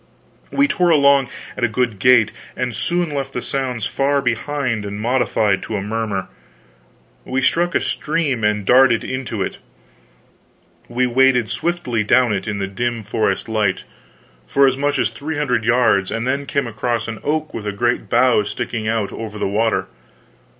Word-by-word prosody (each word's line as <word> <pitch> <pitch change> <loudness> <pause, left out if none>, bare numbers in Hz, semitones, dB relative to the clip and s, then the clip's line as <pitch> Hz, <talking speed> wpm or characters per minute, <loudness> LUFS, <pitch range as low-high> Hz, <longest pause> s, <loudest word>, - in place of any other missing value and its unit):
We 280 +1 +3
tore 180 -10 +1
along 140 -4 +4 0.3
at 125 - -5
a - - +5
good 115 -2 -1
gait, 125 0 +5 0.3
and 125 -1 -2
soon 175 -3 -1
left 135 -1 -3
the 125 - -3
sounds 125 -5 -2
far 140 +1 +1
behind 125 -2 -1
and 100 0 -5
modified 110 -4 +1
to 110 - -5
a - - -3
murmur. 105 -2 -2 1.0
We 130 0 -2
struck 175 +5 +1
a - - +4
stream 150 -7 -1
and 105 -1 +1
darted 125 0 +5
into 130 -3 -3
it. - - -5 1.3
We 125 +2 0
waded 125 -2 +3
swiftly 165 -11 -1
down 120 +1 +3
it, 100 0 -3
in 105 -1 -2
the 100 - -1
dim 115 +3 -3
forest 110 +3 -1
light, 105 -4 0 0.6
for 140 - +4
as 130 -1 +3
much 145 +1 0
as - - +1
three 155 +2 -5
hundred 125 -7 0
yards, 115 -5 +3
and 115 +1 -3
then 140 +2 -1
came 140 -2 0
across 115 0 -2
an 110 -2 -5
oak 155 +1 -1
with 105 -2 -5
a - - 0
great 120 +4 -1
bough 125 -2 +4
sticking 110 +2 -4
out 110 -2 -1
over 110 -2 -6
the - - -1
water. 110 +3 +1
120 Hz, 170 wpm, -19 LUFS, 110-135 Hz, 1.3 s, a